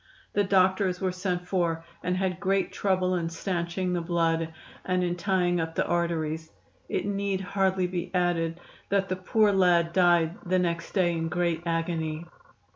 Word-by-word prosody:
The 205 - +3
doctors 190 -1 +2
were 190 -1 0
sent 180 -1 -3
for, 170 -3 0 0.2
and 180 +1 -1
had 185 -2 -1
great 195 -1 +1
trouble 185 -2 +1
in 170 -2 -1
stanching 175 +1 -2
the 175 - 0
blood, 165 -1 0 0.3
and 185 -1 0
in 175 0 0
tying 175 -2 +1
up 165 0 -4
the - - +1
arteries. 160 -2 -1 0.4
It - - -1
need 200 -1 -1
hardly 190 -1 +1
be 180 -1 -3
added 175 -2 0 0.3
that 195 -1 +1
the 185 - 0
poor 210 +3 +2
lad 175 -3 +3
died 175 -1 +3
the 185 -1 +1
next 170 -2 -1
day 180 -3 +3
in 165 -1 -2
great 170 -1 0
agony. 165 -1 -2
180 Hz, 165 wpm, -27 LUFS, 170-190 Hz, 0.4 s, The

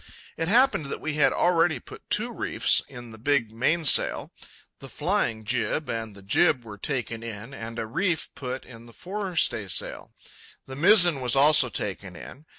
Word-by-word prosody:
It 165 - -2
happened 240 - +3
that - - -5
we 155 - -4
had 150 0 +3
already 175 -2 +2
put - - -14
two - - +1
reefs - - +1
in 120 -1 -11
the 110 - -13
big 125 -3 0
mainsail. 150 +7 +2 0.5
The 135 - -11
flying 150 - -1
jib 125 +6 -1
and 115 -2 -5
the 100 - -14
jib 120 - +2
were 105 -2 -10
taken 120 -5 -3
in, 115 +2 -8
and 115 -2 -8
a 115 - -3
reef 165 - -2
put 130 -1 -6
in 115 -2 -13
the 115 - -16
fore 190 - -6
staysail. 110 - -1 0.5
The 135 - -9
mizzen 175 -2 +5
was 125 -1 +2
also 145 -1 +5
taken 95 -3 -5
in. 145 - -12
130 Hz, 170 wpm, -25 LUFS, 115-160 Hz, 0.5 s, mizzen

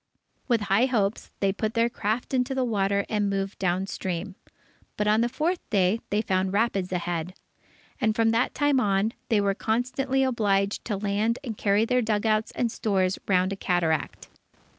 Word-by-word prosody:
With 235 -4 +2
high 205 +5 +3
hopes, 210 -5 -1
they 195 -1 +2
put 215 +2 -3
their 230 0 +3
craft 225 +2 -3
into 255 +1 0
the 260 - +1
water 200 -3 0
and 205 -2 0
moved 195 0 -3
down 185 0 0
stream. 190 0 -4 0.6
But 210 - 0
on 215 +2 +4
the 240 - +1
fourth 330 +7 -1
day, 195 +1 +2
they 210 +2 +1
found 190 -2 0
rapids 200 -4 0
ahead. 175 0 -3 0.6
And 220 -1 +1
from 225 0 +3
that 230 +2 +1
time 290 -2 +3
on, 205 0 +1 0.2
they 220 -3 +3
were 200 -1 +2
constantly 260 +5 0
obliged 205 -6 +1
to 210 -4 -2
land 210 +3 0
and 230 -5 -4
carry 205 +2 +2
their 250 +1 +2
dugouts 215 -1 +1
and 235 -2 0
stores 190 -4 0
round 185 0 +2
a - - -4
cataract. 170 -5 -1
210 Hz, 175 wpm, -26 LUFS, 195-230 Hz, 0.6 s, on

